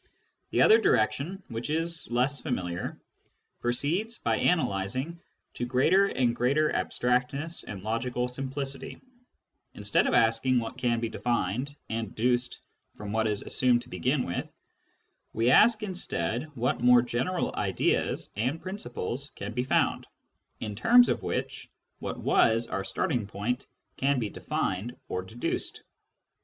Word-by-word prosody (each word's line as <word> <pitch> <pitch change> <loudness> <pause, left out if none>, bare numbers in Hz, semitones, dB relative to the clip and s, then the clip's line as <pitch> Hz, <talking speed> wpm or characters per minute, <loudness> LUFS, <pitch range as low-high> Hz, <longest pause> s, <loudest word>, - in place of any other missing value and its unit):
The - - +3
other 440 0 +7
direction, 185 +7 +1
which 115 +3 -5
is 165 +1 -1
less 125 +4 +1
familiar, 90 - -3 0.6
proceeds, 165 - -1
by - - 0
analysing, 130 - 0 0.3
to 120 - -3
greater 160 +11 +4
and 125 -8 +1
greater 140 +6 +2
abstractness 125 +7 0
and 100 -3 -7
logical 120 +3 -1
simplicity; 135 +2 -5 0.8
instead - - +1
of - - +2
asking 115 +3 +3
what 115 -1 -3
can 120 -2 +1
be 115 - -1
defined 120 +4 -1
and 110 -2 -4
deduced 125 +2 0 0.3
from 105 -1 -7
what 110 0 +1
is 105 -1 -1
assumed 125 -2 +2
to - - -16
begin 130 +1 0
with, 85 - -4 0.8
we 115 +3 +3
ask 215 - +6
instead 125 - -2
what 125 +3 0
more 125 0 +6
general 125 +10 -1
ideas - - 0
and 125 +10 -1
principles 140 - -5
can 105 +2 -6
be 125 +1 0
found, 130 - +1 0.5
in 110 -2 -4
terms 240 - +6
of - - 0
which - - -4 0.3
what - - -4
was 115 +1 +3
our 95 -3 -3
starting 110 +2 -1
point 105 +6 -3 0.3
can 140 +1 +2
be 110 -4 -1
defined 100 +7 -3
or 90 - -2
deduced. 110 +6 -3
125 Hz, 135 wpm, -28 LUFS, 115-145 Hz, 0.8 s, other